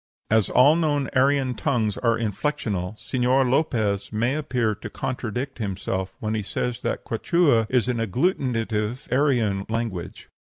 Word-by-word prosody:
As 110 -2 +3
all 140 +5 +6
known 145 -5 0
Aryan 135 0 +3
tongues 115 -5 0
are 115 -2 +2
inflexional, 110 -3 -2
Señor 130 +2 +1
Lopez 110 -7 0
may 115 +4 0
appear 125 -7 0
to 110 +2 -8
contradict 125 +1 -4
himself 95 -2 -3
when 110 0 -2
he 110 - -1
says 120 +4 -3
that - - -2
Quichua 120 -2 +2
is 125 -3 +2
an 125 -1 0
agglutinative 115 - 0
Aryan 120 -8 +2
language. 110 -7 -4
120 Hz, 140 wpm, -24 LUFS, 105-135 Hz, -, all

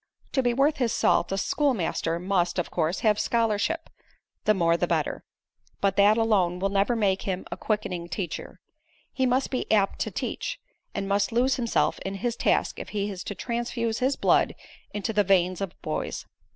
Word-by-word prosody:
"To 265 - +2
be 245 -1 +2
worth 280 +5 +2
his 245 -5 +1
salt, - - +2
a 195 - 0
schoolmaster 195 - 0
must, 180 0 0
of 175 - -2
course, 165 +1 0
have 210 -2 +3
scholarship 230 +8 0 0.6
the 215 - +4
more 170 -2 +3
the - - 0
better. - - -1 0.6
But 195 -1 +1
that 205 +2 +6
alone 200 -6 +2
will 195 +2 0
never 200 +4 +2
make 195 -4 +1
him 190 -1 -3
a - - -2
quickening 180 -5 -2
teacher. 180 0 -5 0.5
He 260 -1 +1
must 255 +2 +1
be 255 - -2
'apt 205 -3 +2
to - - -1
teach,' - - -4 0.4
and 200 -1 -2
must 200 0 +1
lose 250 +3 +2
himself 235 -3 +1
in 195 +1 -4
his 235 +4 -2
task - - +1
if - - -7
he 205 -1 -2
is 190 -2 -6
to 205 - -4
transfuse 235 -1 -2
his 265 +2 +2
blood - - +3 0.4
into 210 +1 -3
the 205 0 +3
veins 185 -1 +2
of 195 -3 -5
boys. - - -3
205 Hz, 185 wpm, -26 LUFS, 190-235 Hz, 0.6 s, that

